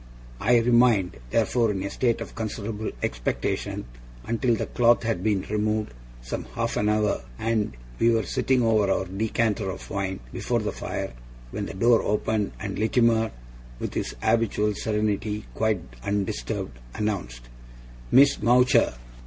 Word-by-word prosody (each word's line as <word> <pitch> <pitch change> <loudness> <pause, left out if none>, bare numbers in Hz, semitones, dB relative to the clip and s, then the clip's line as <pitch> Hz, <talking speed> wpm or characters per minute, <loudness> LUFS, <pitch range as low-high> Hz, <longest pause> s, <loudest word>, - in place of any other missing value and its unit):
I 120 +3 +4
remained, 115 - +4
therefore, 115 - +2
in 95 -2 -2
a 100 - -3
state 120 -3 +1
of - - -6
considerable 110 -1 -4
expectation - - -2 0.4
until 115 +1 +1
the - - -2
cloth 120 0 +3
had 110 -6 -1
been 100 -2 +1
removed 105 - 0 0.3
some - - -4
half - - -1
an 105 - +1
hour, 105 -1 +1 0.2
and 110 - -1 0.2
we 115 - +5
were 115 -1 +3
sitting 130 +4 +1
over 110 -3 +3
our 95 0 +1
decanter 105 +1 0
of 95 - -7
wine 95 -3 -2
before - - 0
the - - -2
fire, - - -4 0.4
when 100 -1 -3
the - - -7
door 115 +3 +4
opened, 105 0 0
and 100 -2 -4
Littimer, 115 0 +3 0.5
with - - -4
his - - -3
habitual 110 -2 +2
serenity 105 0 -1
quite 110 -4 +1 0.2
undisturbed, 75 -11 -2 0.2
announced: 60 - -3 0.6
'Miss 140 +2 +6
Mowcher! 125 - +4
110 Hz, 145 wpm, -25 LUFS, 100-115 Hz, 0.6 s, Miss